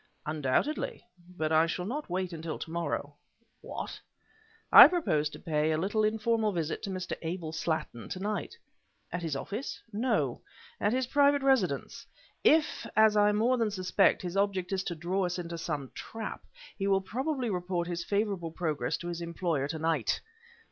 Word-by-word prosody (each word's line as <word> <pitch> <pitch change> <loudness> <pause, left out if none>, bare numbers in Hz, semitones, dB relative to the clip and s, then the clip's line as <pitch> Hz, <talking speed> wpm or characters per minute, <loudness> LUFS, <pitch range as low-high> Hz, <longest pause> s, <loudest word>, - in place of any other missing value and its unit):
"Undoubtedly. 150 - -1 0.3
But 155 0 -1
I 160 +1 +5
shall 180 +2 -3
not 280 +6 -4
wait 185 0 -2
until 160 -1 -4
tomorrow." 170 +1 -3 0.5
"What!" - - -6 0.7
"I - - +13
propose 155 - +1
to - - -10
pay 155 -2 0
a 155 - +1
little 205 +6 0
informal 220 0 +1
visit 165 -4 -2
to 205 - -5
Mr. 185 -1 -3
Abel 165 -1 -4
Slattin, 160 -8 -3
to 185 - -4
night." 210 - -3 0.5
"At 180 - -3
his 160 -4 -2
office?" 210 - -4
"No; 240 +5 0 0.4
at 205 - +2
his 255 +2 +1
private 285 +1 +3
residence. 215 - +1 0.4
If, 305 -6 +3
as 220 -1 +6
I 210 0 +5
more 235 +4 +2
than 225 -2 +2
suspect, 185 -1 +2
his 175 0 -4
object 195 -2 0
is 190 -1 0
to 170 - -3
draw 180 +4 -1
us 180 - -3
into 170 -1 -5
some 150 -5 -4
trap, 225 -1 -7 0.3
he 195 -1 -2
will 195 -1 +3
probably 255 +4 -2
report 180 -1 -2
his 170 -1 -3
favorable 200 -4 -1
progress 160 -2 -2
to 175 - -7
his 175 0 -4
employer 170 -4 -1
to 160 +2 -4
night!" 160 -5 0
185 Hz, 170 wpm, -30 LUFS, 165-215 Hz, 0.7 s, I